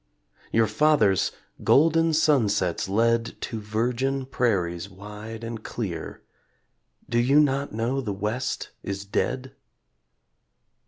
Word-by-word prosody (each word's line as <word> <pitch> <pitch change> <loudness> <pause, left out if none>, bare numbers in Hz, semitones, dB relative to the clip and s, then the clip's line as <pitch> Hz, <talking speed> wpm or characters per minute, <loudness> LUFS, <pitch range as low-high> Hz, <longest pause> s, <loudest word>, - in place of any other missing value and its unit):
Your 115 0 +4
fathers, 115 -8 +3 0.3
golden 165 +2 +4
sunsets 105 - +2
led 115 +3 +1
To 115 - -4
virgin 125 +5 -1
prairies 95 -9 0
wide 105 +3 -9
and 115 -1 -6
clear 95 -8 -5 0.8
Do 120 - +1
you 135 +5 +5
not 140 -1 +2
know 115 +5 -1
the 110 -5 -3
West 105 +6 -3
is 100 0 -5
dead? 130 +6 -2
115 Hz, 105 wpm, -25 LUFS, 105-135 Hz, 0.8 s, you